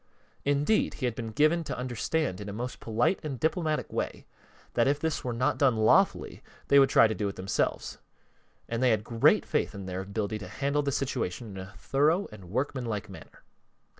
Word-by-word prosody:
Indeed, 145 +9 +2
he 130 - -3
had 120 - 0
been 115 -1 -5
given 155 +8 +2
to - - -4
understand 125 - -2
in 100 - -6
a - - -5
most 120 +4 -5
polite 120 - +1
and 140 -5 -4
diplomatic 160 -1 -1
way - - -3 0.5
that 120 - +3
if 145 +1 +2
this 160 0 -2
were 125 - -2
not 120 +2 0
done 135 -5 +4
lawfully, 110 0 +3 0.3
they 140 - +7
would 135 - +5
try - - +6
to 110 - -2
do 100 +1 -2
it 100 - -4
themselves, 95 +1 -2 0.7
and 115 +1 -2
they 130 - +4
had 110 -2 +2
great 115 0 +3
faith - - -1
in 100 -1 -7
their 95 0 -4
ability 100 +2 -3
to 105 - -8
handle 140 +1 -1
the 140 -1 -1
situation 120 -5 -2
in - - -8
a 95 +2 -9
thorough 155 +8 +1
and 105 -3 -11
workmanlike 115 -3 -2
manner. 95 - -13
120 Hz, 195 wpm, -28 LUFS, 105-140 Hz, 0.7 s, they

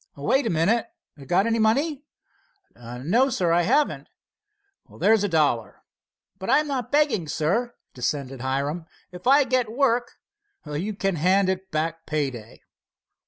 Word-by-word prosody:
"Wait 235 - +1
a - - 0
minute—got 195 - -1
any 230 0 +1
money?" 275 +7 +1 0.7
"No, 135 - 0
sir, 180 -9 0
I 170 +1 +4
haven't." 295 - +1 0.9
"There's 220 -2 +3
a 205 - 0
dollar." 145 - 0 0.6
"But 190 - -5
I'm 300 +4 +4
not 265 -5 -3
begging, 285 - +2
sir," 195 +12 -1 0.2
dissented 130 0 -3
Hiram. 140 +6 -2 0.2
"If 180 +4 -8
I 280 +2 +6
get 250 -3 0
work——" 245 -1 +1 0.5
"You 160 +8 -4
can 195 -3 -1
hand 185 +4 +3
it 190 0 -3
back 165 +1 -3
pay 150 -3 -1
day." 115 -3 -12
190 Hz, 135 wpm, -24 LUFS, 150-240 Hz, 0.9 s, I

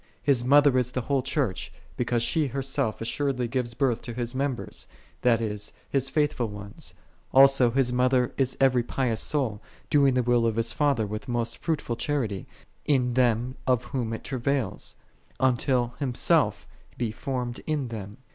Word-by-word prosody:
His 135 -4 +3
mother 140 0 +5
is 125 -1 0
the 125 0 -2
whole 135 +2 0
Church, 125 - -1 0.2
because 120 -1 0
she 155 +4 +1
herself 135 -3 -1
assuredly 125 +1 -1
gives 120 -1 -2
birth 130 -5 +1
to 120 - -6
His 120 0 -3
members, 135 -1 -3 0.3
that 120 -3 +4
is, 105 -2 -3 0.2
His 135 -1 +1
faithful 150 -6 +1
ones. 100 -1 -9 0.4
Also 135 -2 +6
His 125 0 +1
mother 125 0 +2
is 130 -2 0
every 130 -2 +4
pious 120 -1 -1
soul, 130 -9 -1 0.3
doing 140 -3 +4
the 125 - +2
will 120 -1 +3
of 110 - 0
His 115 0 0
Father 140 -7 +2
with 105 +5 -6
most 120 -1 -2
fruitful 150 -8 -2
charity, 120 - -2 0.4
in 125 -4 +1
them 125 +1 +1
of 125 -2 +2
whom 120 -3 -3
it 115 - -5
travaileth, 135 0 -2 0.4
until 125 -1 +1
Himself4 130 -4 +1 0.3
be 115 -3 -1
formed 125 +1 -4
in 145 -5 -1
them. 105 -1 -7
125 Hz, 160 wpm, -26 LUFS, 115-135 Hz, 0.4 s, Also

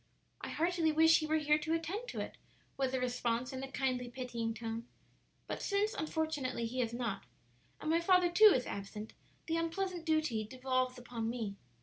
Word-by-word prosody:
"I - - -5
heartily 335 -1 +1
wish 320 +1 +6
he 310 - -2
were 315 +1 +3
here 300 0 +3
to 320 +2 0
attend 365 +9 -3
to - - -5
it," - - -6 0.4
was 265 -1 0
the 260 - 0
response, 245 0 -1
in 260 - -4
a 270 0 -6
kindly 255 -2 -1
pitying 235 -3 -3
tone. 230 0 -5 0.6
"But - - -4
since, 410 +2 +1
unfortunately, 310 - -1
he 250 +3 -1
is 230 -2 -1
not, 235 -4 -3 0.5
and 310 - -1
my 330 - +4
father, 360 0 +4
too, 425 +4 +8
is 250 - 0
absent, 210 +2 -6 0.3
the 330 0 0
unpleasant 345 +1 -2
duty 310 -9 +1
devolves 255 +2 -1
upon 235 -2 -4
me. 225 -4 -3
265 Hz, 185 wpm, -34 LUFS, 240-325 Hz, 0.6 s, too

